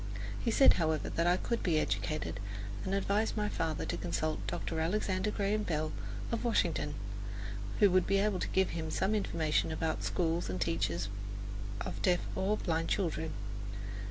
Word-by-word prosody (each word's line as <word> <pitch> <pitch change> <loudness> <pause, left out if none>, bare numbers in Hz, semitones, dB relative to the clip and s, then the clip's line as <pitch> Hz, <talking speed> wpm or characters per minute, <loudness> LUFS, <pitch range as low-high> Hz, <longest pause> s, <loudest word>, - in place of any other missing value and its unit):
He - - +2
said, 270 +4 +7
however, 160 -1 +1
that 170 +1 +1
I 175 +1 +5
could 235 +4 -1
be 165 -4 +2
educated, 155 -6 -1 0.4
and 190 - 0
advised 205 +3 +1
my 210 0 +1
father 160 -5 -1
to - - -2
consult 155 0 -1
Dr. 165 -2 -2
Alexander 185 +3 +1
Graham 210 0 +1
Bell 155 -5 -1 0.4
of 230 - -1
Washington, 235 -2 +1 0.8
who 205 -3 +7
would 185 -1 +4
be 195 - +4
able 200 -1 +2
to - - -1
give 190 -1 +2
him 160 -1 -3
information 170 -6 +1
about 160 0 -1
schools 170 - 0
and 90 0 -2
teachers 90 0 0 0.7
of - - -4
deaf 180 -1 +3
or 205 +3 +1
blind 165 -3 0
children. 160 -4 0
175 Hz, 155 wpm, -33 LUFS, 160-200 Hz, 0.8 s, said